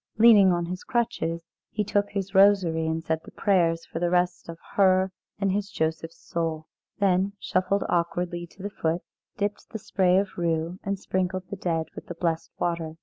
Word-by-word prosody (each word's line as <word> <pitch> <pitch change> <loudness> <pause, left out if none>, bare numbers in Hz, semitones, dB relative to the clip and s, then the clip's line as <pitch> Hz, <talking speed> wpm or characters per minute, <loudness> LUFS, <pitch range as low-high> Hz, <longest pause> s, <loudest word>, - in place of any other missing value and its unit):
Leaning 215 -4 +7
on 175 -1 0
his 180 +2 -5
crutches, 230 -9 -1 0.3
he 210 - -1
took 205 0 0
his 195 -1 -4
rosary 190 -5 +4
and 160 0 -1
said 160 0 0
the - - -11
prayers 170 -4 +1
for 165 - -5
the 175 0 +1
rest 180 -1 0
of 165 - -6 0.2
her 190 -1 +4 0.3
and 195 -1 +1
his 200 +1 -1
Joseph's 160 -1 -2
soul; 160 -2 -3 0.3
then 195 0 +2
shuffled 185 +2 0
awkwardly 175 0 -1
to 190 +3 -14
the 205 - -4
foot, 165 -2 -1 0.3
dipped 205 0 -3
the 220 - -5
spray 185 -3 +2
of 195 -2 -1
rue, 165 +1 -1
and 200 0 -1
sprinkled 185 -1 -2
the - - -2
dead 165 -4 -1
with - - -10
the 175 - -6
blessed 165 -1 -1
water. 170 -2 -2
180 Hz, 185 wpm, -26 LUFS, 165-195 Hz, 0.3 s, Leaning